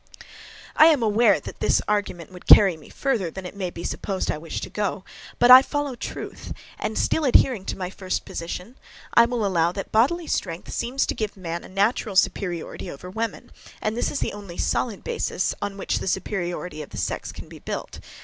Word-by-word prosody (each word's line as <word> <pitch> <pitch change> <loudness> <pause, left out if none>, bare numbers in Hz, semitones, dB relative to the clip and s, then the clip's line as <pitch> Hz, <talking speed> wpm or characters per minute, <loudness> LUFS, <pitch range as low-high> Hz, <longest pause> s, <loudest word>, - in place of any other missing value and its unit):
I 310 - +8
am 300 -7 +4
aware, 215 -1 +4
that - - -9
this - - +3
argument 200 -5 -2
would 180 -1 -13
carry 195 -4 +8
me 155 - -15
further 235 -11 -1
than 190 +3 -8
it 180 - -8
may 190 -3 -3
be 170 -1 -8
supposed 195 -2 -2
I - - -3
wish 165 +1 -5
to - - -5
go; 205 -2 -2 0.3
but 245 +1 +6
I 255 +1 +12
follow 290 0 -2
truth, 240 - -7 0.3
and - - -3
still 320 - +1
adhering 250 -6 +4
to - - -4
my 185 -1 -4
first 185 -2 -3
position, 180 +8 -6 0.4
I 235 - +7
will 235 -3 -1
allow 170 -3 +2
that 195 - -6
bodily 285 +11 +3
strength 170 - -3
seems 260 +3 0
to - - -1
give 215 -2 -4
man 170 -2 -5
a - - -11
natural 205 +2 0
superiority 180 -3 0
over 180 +6 -9
woman; 225 +3 -4 0.3
and 215 +1 -1
this 240 - 0
is 290 - -3
the - - -1
only 200 -4 -9
solid 230 -5 -1
basis 475 -1 -1
on 200 -1 -3
which 195 - -1
the - - -5
superiority 180 -4 -2
of 150 - -9
the - - -9
sex - - -3
can - - -10
be - - -12
built. - - -6
200 Hz, 205 wpm, -24 LUFS, 180-235 Hz, 0.4 s, I